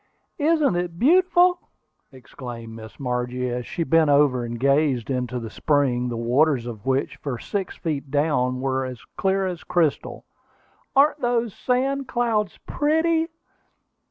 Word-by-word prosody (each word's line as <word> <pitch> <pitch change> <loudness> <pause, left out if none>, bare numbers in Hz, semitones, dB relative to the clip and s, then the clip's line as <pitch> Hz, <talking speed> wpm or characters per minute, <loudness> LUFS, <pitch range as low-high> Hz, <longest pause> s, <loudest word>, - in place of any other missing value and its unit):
"Isn't 300 - +2
it 175 -1 -3
beautiful!" 360 - +4 0.5
exclaimed 120 -3 -9
Miss 110 -1 -11
Margie, 125 -1 -2
as 125 0 -4
she 170 - -2
bent 165 -2 +3
over 140 -3 +3
and 120 0 -5
gazed 140 -2 +2
into 125 -1 -2
the 115 -2 -7
spring, 130 -4 +1
the 120 - -4
waters 125 +2 +2
of 120 0 -8
which, 135 +1 0
for 135 -4 -4
six 195 - -4
feet 150 -4 -4
down, 130 -3 +1
were 130 0 0
as 130 -2 -7
clear 195 0 +1
as 180 -3 -4
crystal. 165 -5 -1 0.7
"Aren't 290 +2 +4
those 240 -4 0
sand 265 +2 -1
clouds 225 -5 0
pretty?" 320 +2 +1
145 Hz, 140 wpm, -23 LUFS, -, 0.7 s, beautiful